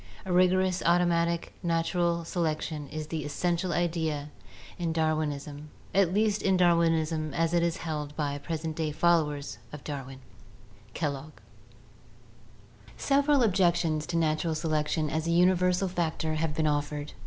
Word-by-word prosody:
A 185 - -2
rigorous 185 0 +3
automatic 170 -1 +2
natural 170 0 0
selection 155 -3 -2
is 155 -1 -5
the 155 0 -4
essential 170 +4 -1
idea 160 -4 -1 0.5
in 170 -2 -1
Dar 160 -1 +2
winism, 150 -1 -4 0.3
at 190 -3 +3
least 210 +1 +1
in 190 -1 +2
Darwinism 165 -3 +2
as 165 0 +1
it 170 - +3
is 170 +1 0
held 150 -2 -4
by 145 -2 -1
the 145 - -5
present 160 +1 -4
day 155 -1 -1
followers 155 -3 +1
of 150 -2 -9
Darwin" 135 -3 -6 0.8
(Kellogg). 150 -1 -3 1.6
Several 280 -1 +3
objections 175 -6 +2
to 170 - -1
natural 160 0 +1
selection 155 0 0
as 160 +2 -2
a - - +1
universal 180 +2 +3
factor 165 -3 -2
have 155 -1 -1
been 155 0 0
offered. 145 0 -1
165 Hz, 140 wpm, -28 LUFS, 155-175 Hz, 1.6 s, rigorous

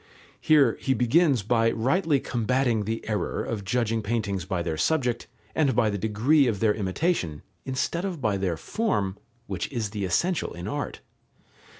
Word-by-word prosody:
Here 140 -7 +4
he 130 - +1
begins 130 +1 +3
by 115 +2 +3
rightly 140 +7 +1
combating 120 -2 0
the 115 +2 -4
error 105 -2 -1
of 105 -3 -4
judging 115 +2 0
paintings 100 -4 -2
by 90 -2 -2
their 80 -2 -2
subject 125 - 0 0.3
and 140 -6 +2
by 110 -3 +3
the 100 - -2
degree 120 +8 +3
of 105 -5 -1
their 110 -1 +3
imitation, 95 - -1 0.2
instead 135 +6 -1
of 185 -5 -3
by 105 -6 0
their 90 -4 -1
form, 105 - -1 0.3
which - - -4
is 115 -6 -2
the 105 -2 -3
essential 170 - 0
in 85 +2 -7
art. 145 +4 -4
115 Hz, 165 wpm, -26 LUFS, 100-140 Hz, 0.3 s, Here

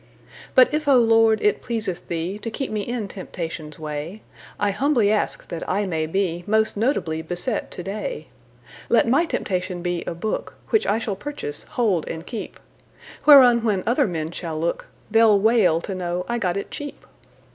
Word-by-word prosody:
But 255 +1 +6
if, 305 0 -1
O 275 -2 +6
Lord, 225 -2 +4
it 420 - +2
pleaseth 220 -7 -4
TheeTo 185 +7 -3
keep 270 +4 -4
me 215 -1 -1
in 230 0 -3
temptation's 165 -5 -6
way,I 160 +6 -5
humbly 240 -2 +2
ask 215 - -1
that 170 - -5
I 200 +2 +1
may 160 -4 -1
beMost 195 +5 0
notably 200 - 0
beset 175 +7 -3
to 180 - -7
day; 215 - -4 0.6
Let 235 0 +4
my 275 +8 +3
temptation 185 - -3
be 175 -1 -2
a - - -3
book, 210 +6 -3 0.2
Which 440 - +3
I 205 - +2
shall 220 -3 -3
purchase, 285 - -6
hold, 200 -10 +1
and 165 +1 -6
keep, 225 +1 -7 0.7
Whereon 250 -5 +8
when 205 -5 +1
other 255 +4 +2
men 160 -3 -3
shall 165 -2 -5
look, 170 +1 -2 0.2
They 225 +1 +5
'll 210 -3 +6
wail 205 -6 +4
to 195 - -5
know 180 -1 -3
I 240 0 -1
got 185 -3 0
it 200 - -5
cheap. 290 -1 -7
205 Hz, 170 wpm, -23 LUFS, 175-235 Hz, 0.7 s, Whereon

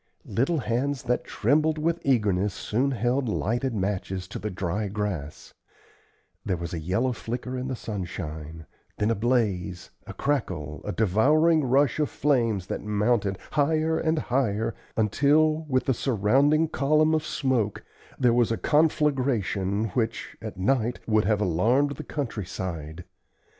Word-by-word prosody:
Little 140 +8 0
hands 130 +1 -1
that 125 0 0
trembled 150 +7 +1
with 165 +2 0
eagerness 105 -7 +1
soon 125 +6 0
held 125 0 0
lighted 120 +4 -1
matches 95 -2 -2
to - - -6
the 105 - -3
dry 95 +2 -2
grass; 95 -8 -4 0.9
there 95 -5 -1
was 85 +1 -5
a 85 - -2
yellow 95 +11 0
flicker 125 +2 -5
in 130 0 -3
the 130 - -2
sunshine, 80 -7 -6 0.3
then 105 +2 +1
a - - +1
blaze, 100 -6 -1 0.2
a - - -6
crackle, 95 - -2
a 105 - -2
devouring 150 - +3
rush 135 +2 +2
of 150 - +1
flames 115 -9 +1
that - - -4
mounted 105 -1 +1
higher 155 +2 +1
and 160 0 +1
higher 115 -6 0 0.2
until, 150 +8 +3
with 130 -1 +1
the 135 - +2
surrounding 135 +7 +2
column 155 +1 +2
of 155 -1 +1
smoke, 130 -9 -1 0.3
there 125 -2 +3
was 120 -2 +3
a 115 - 0
conflagration 130 -10 +1
which, 110 +4 -2
at - - -7
night, 120 +4 +1
would 110 -2 +2
have 105 0 +1
alarmed 115 - +2
the - - -6
country 125 -8 -4
side. 85 -3 -5
115 Hz, 145 wpm, -26 LUFS, 100-140 Hz, 0.9 s, devouring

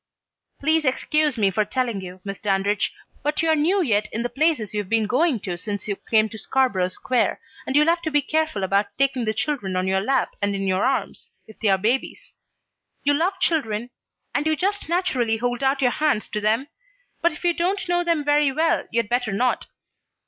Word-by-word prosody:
"Please 315 +2 +2
excuse 295 +1 +1
me 200 -3 +2
for 210 +3 +1
telling 230 -1 -2
you, 185 0 -9
Miss 195 -1 -5
Dandridge, 200 0 0 0.3
but 300 +2 0
you're 320 -1 +3
new 355 +6 +2
yet 215 -6 0
in 230 - -2
the 245 - -2
places 290 -9 +1
you've 205 -3 -3
been 225 -1 +2
going 255 +3 +2
to 180 -4 -4
since 205 +1 -4
you 200 - -1
came 220 +2 +2
to 220 - -8
Scarborough 225 -7 +1
Square, 240 +7 0 0.3
and 265 - -1
you'll 300 +1 +6
have 335 +1 +2
to 325 - -2
be 295 -2 +2
careful 310 -9 -1
about 200 +2 +2
taking 270 -3 +1
the 215 - 0
children 220 -6 -2
on 185 0 0
your 190 0 +1
lap 265 +4 +1
and 200 0 0
in 195 - -2
your 190 0 +1
arms, 270 0 -2 0.2
if 220 - -16
they're 200 -4 +3
babies. 230 +7 -2 0.7
You 290 - +3
love 360 +6 0
children, 245 - 0 0.4
and 290 +2 0
you 315 - +2
just 395 +3 -2
naturally 265 -11 +1
hold 245 +2 -2
out 270 0 +1
your 245 - +4
hands 295 -8 0
to 210 - -3
them, 225 +7 +1 0.5
but 340 - +3
if 305 - -11
you 350 -1 +3
don't 365 +3 -1
know 350 0 +1
them 335 -3 +1
very 290 -1 +3
well, 320 +4 +1
you'd 230 -2 0
better 245 -1 0
not. 245 +6 0
250 Hz, 205 wpm, -23 LUFS, 210-305 Hz, 0.7 s, you'll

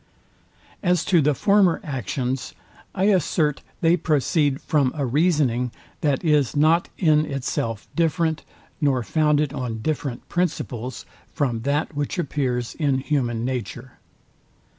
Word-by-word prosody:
As 180 -3 +1
to 175 -2 +4
the 145 0 +2
former 200 - +3
actions, 130 - -3 0.4
I 190 - 0
assert 165 -6 +2 0.2
they 165 +1 +4
proceed 150 -3 +1
from 140 -4 +1
a 145 -3 -1
reasoning, 135 -3 +2 0.3
that 145 -1 0
is 150 -4 +2
not 160 +4 +3
in 155 -4 +4
itself 115 -5 -3
different, 165 -1 +1 0.4
nor 135 -4 +2
founded 150 +1 +1
on 120 -5 -4
different 145 -4 -3
principles, 130 -8 -3 0.3
from 125 -7 0
that 150 +1 -1
which 145 +5 -2
appears 130 -7 -1
in 140 -4 +1
human 125 -5 -1
nature. 125 0 -5
145 Hz, 120 wpm, -23 LUFS, 130-160 Hz, 0.4 s, to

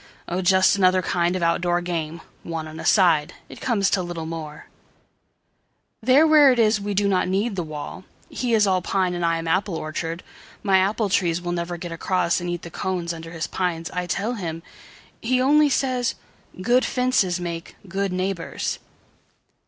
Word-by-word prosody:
Oh, 180 +2 -2
just 190 +2 +4
another 185 -1 +3
kind 175 +1 0
of 180 - -2
out 170 0 +2
door 175 0 +1
game, 165 -2 -4 0.2
One 165 -2 -5
on 155 +1 -9
a - - -6
side. 165 -7 +3
It - - -11
comes 205 -6 +1
to 190 - +2
little 175 -2 -5
more:There 165 - -4
where 300 -3 +7
it 250 - +1
is 215 -2 +3
we 205 0 -3
do 200 +1 +2
not 190 -2 +1
need 200 +4 0
the 180 - -1
wall:He 175 - -5
is 210 -1 +4
all 185 -2 +2
pine 185 0 0
and 175 -1 -3
I 165 0 +2
am 165 0 -5
apple 185 +2 0
orchard.My 165 +5 -2
apple 205 +2 +1
trees 175 -3 +1
will 175 0 -4
never 175 0 -3
get 170 0 -7
acrossAnd 175 0 0
eat 175 -1 -4
the 170 - -8
cones 175 -1 -2
under 165 0 -8
his 165 -1 -4
pines, 175 -3 -3
I 180 0 -3
tell 215 +6 -1
him. 165 -7 -5 0.6
He 250 +2 +1
only 295 +3 +4
says, 255 -3 0 0.4
"Good 245 +7 +3
fences 250 -9 +1
make 170 -1 -6
good 195 +1 -2
neighbours." 185 -1 -3
180 Hz, 175 wpm, -23 LUFS, 170-200 Hz, 0.6 s, where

